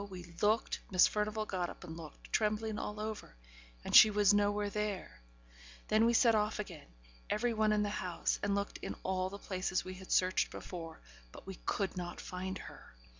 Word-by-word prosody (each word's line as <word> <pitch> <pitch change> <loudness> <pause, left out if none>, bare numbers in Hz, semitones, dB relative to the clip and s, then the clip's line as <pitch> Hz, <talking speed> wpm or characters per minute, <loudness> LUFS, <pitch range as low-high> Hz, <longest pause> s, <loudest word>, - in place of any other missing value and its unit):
we 185 -2 -8 0.2
looked 215 +2 +2
Miss 185 -2 +6
Furnivall 215 +1 -1
got 180 -4 -2
up - - -11
and 160 -2 -7
looked, 160 -3 -11
trembling 215 0 0
all 210 0 -5
over 215 - -5 0.5
and - - 0
she 220 - +11
was 205 -1 +4
nowhere 205 0 +1
there; 210 - -3 0.7
then 220 +2 +4
we 235 - +3
set 235 0 +5
off 210 0 +1
again, 180 -8 -7 0.4
every 235 +2 +1
one 215 -1 +2
in 210 0 +2
the 205 - -1
house, 180 -2 -1
and 200 0 +1
looked 200 0 -3
in - - -5
all 185 0 -1
the 200 - -7
places 185 -2 -2
we 185 - -6
had 185 0 -10
searched 185 0 +3
before, 165 -3 -8 0.3
but - - -12
we 195 - -6
could 195 -1 -1
not 175 -1 -5
find 185 +1 -5
her. - - -12
205 Hz, 190 wpm, -34 LUFS, 185-215 Hz, 0.7 s, she